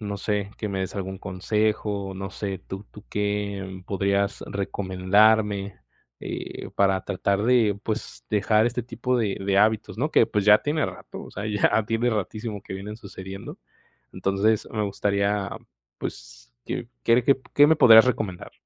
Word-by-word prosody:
no 100 -1 -4
sé, 100 0 -2
que 105 - -3
me 95 -1 -2
des 95 - -4
algún 95 -1 -4
consejo, 100 +1 -1
no 95 +1 -5
sé, 100 -1 -4
¿tú 95 +2 -9
tú 105 - -13
qué 100 -2 -3
podrías 100 +1 0
recomendarme?, 100 +1 +2 0.5
eh, - - -6
para 95 -1 +3
tratar 100 +1 0
de, 110 -4 +3
pues, 105 - -5
dejar 105 +1 +3
este 120 +1 -2
tipo 125 +2 -1
de 105 -4 0
de 100 0 +2
hábitos, 110 +1 +2
¿no?, 150 +5 0
que, - - +5
pues, 105 -1 -1
ya 105 0 +8
tiene 150 0 0
rato, 95 -1 -9
o - - -12
sea, 100 - -6
ya 105 +1 +2
tiene 115 +2 +1
ratísimo 105 0 -3
que - - -9
vienen 100 +3 -6
sucediendo, 95 -2 -9 0.5
entonces 100 +3 +1
me 110 - -1
gustaría, 100 0 0 0.5
pues, - - -8
¿qué - - -4 0.2
qué 115 - +5
re 125 - +2
qué 135 0 +3
qué 145 - +7
me 160 +1 +4
podrías 110 -5 +9
recomendar? 110 -8 -2
100 Hz, 165 wpm, -25 LUFS, 95-110 Hz, 0.5 s, podrías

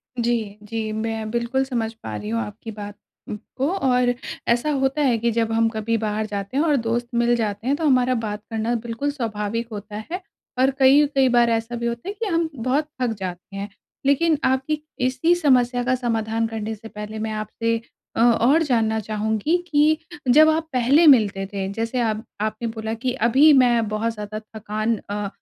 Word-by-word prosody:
जी, 230 -4 -1
जी। 220 0 -4
मैं 220 0 -3
बिल्कुल 240 +3 0
समझ 235 -4 -2
पा 110 -1 -5
रही 105 0 -5
हूँ 115 0 0
आपकी 110 - -7
बात 205 -1 -8 0.6
को। 275 +4 +1
और 250 -8 +2 0.3
ऐसा 240 +6 +2
होता 270 +1 0
है 250 -5 +3
कि 235 +1 0
जब 225 0 0
हम 225 0 +3
कभी 225 +1 -1
बाहर 215 0 -2
जाते 200 +4 -4
हैं 300 - +3
और 300 -3 +3
दोस्त 235 0 -1
मिल 240 0 +3
जाते 220 +1 -3
हैं, 280 - +3
तो 315 - -2
हमारा 255 -2 +3
बात 210 -2 -3
करना 225 +2 -1
बिल्कुल 235 +5 -3
स्वाभाविक 230 -3 -3
होता 210 0 -7 0.2
है। 365 +2 -3 0.4
और 265 +1 +4
कई-कई 270 0 +5
बार 240 -1 +4
ऐसा 230 +1 -1
भी 235 0 -4
होता 235 +8 -4
है - - -3
कि 460 - -1
हम 330 -3 0
बहुत 260 +6 0
थक 245 - +2
जाते 185 +1 -6
हैं। 200 +1 -5 0.4
लेकिन 305 +3 +3
आपकी 270 +4 0 0.3
इसी 260 +7 +2
समस्या 250 -6 +2
का 255 +1 +2
समाधान 225 -2 -1
करने 220 0 -4
से 225 +2 -11
पहले 210 0 -7
मैं 220 0 -3
आपसे 225 +2 -2 0.4
अ, - - 0
और 240 +7 +4
जानना 220 -5 +1
चाहूँगी 220 - 0
कि 305 +1 +4 0.4
जब 310 +2 +7
आप 320 +1 0
पहले 265 +7 +4
मिलते 205 -7 +5
थे। 195 -1 -2
जैसे 230 +3 -2
आप 220 -1 -1 0.2
आपने 215 +2 -2
बोला 220 0 -4
कि 250 +3 -2 0.2
अभी 285 +6 +6
मैं 240 -4 +4
बहुत 220 +2 -1
ज़्यादा 210 0 -6
थकान 215 +1 -3
अ 205 0 -2
230 Hz, 190 wpm, -22 LUFS, 215-260 Hz, 0.6 s, जब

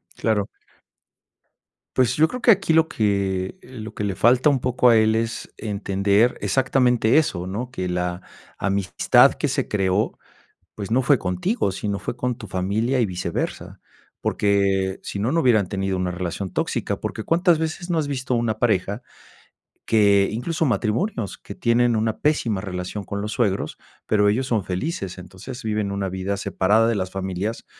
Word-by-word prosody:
Claro. 105 -3 0 1.5
Pues, 130 -1 +3
yo 155 +1 +4
creo 250 +9 -6
que 240 - +6
aquí 195 -5 +2
lo 160 0 +4
que, 100 - -1
eh, 130 -10 -11
lo 110 0 -7
que - - -3
le 100 -2 -1
falta 125 +8 +4
un 135 - +1
poco 125 0 +3
a 115 - +6
él 110 0 +3
es 115 0 -3
entender 100 +1 +1
exactamente 125 +3 +2
eso, 90 - 0
¿no?, 115 +7 -4
que 95 -8 -3
la 90 0 -2 0.4
amistad 100 -2 +3
que - - -2
se - - -1
creó, 95 0 0 0.6
pues, 100 0 -6
no 125 +3 +3
fue 140 +2 +4
contigo, 95 - -1
sino 100 +1 -3
fue 100 +5 -5
con 125 -1 -2
tu 110 -4 -9
familia 105 +8 0
y 120 - +3
viceversa, 90 -3 -4 0.4
porque 100 -2 +1
sino, 105 +5 -2
no 165 - +2
hubieran 110 - +3
tenido 95 -1 -1
una 90 -1 -1
relación 90 +1 -4
tóxica, - - -2
porque, 110 - -4
¿cuántas 170 - +3
veces 160 +3 -3
no 170 - +1
has 155 -2 0
visto 130 -2 -2
una 115 -2 -1
pareja 105 -1 0 0.8
que, 100 -3 +4
incluso 155 +10 -2
matrimonios, 120 - -1
que - - -10
tienen 120 0 +2
una 110 0 -1
pésima 120 -10 +1
relación 95 +1 -5
con 100 +1 -5
los 105 +1 -4
suegros, 100 -5 -1 0.3
pero 105 -1 +3
ellos 125 +5 0
son 115 -6 0
felices?, 95 - -4
entonces 95 +7 -9
viven 105 -2 -1
una 100 -1 -2
vida 95 +2 -3
separada 105 +3 +2
de 115 - +1
las 95 -2 -2
familias, 95 +3 -4
105 Hz, 170 wpm, -23 LUFS, 95-125 Hz, 1.5 s, que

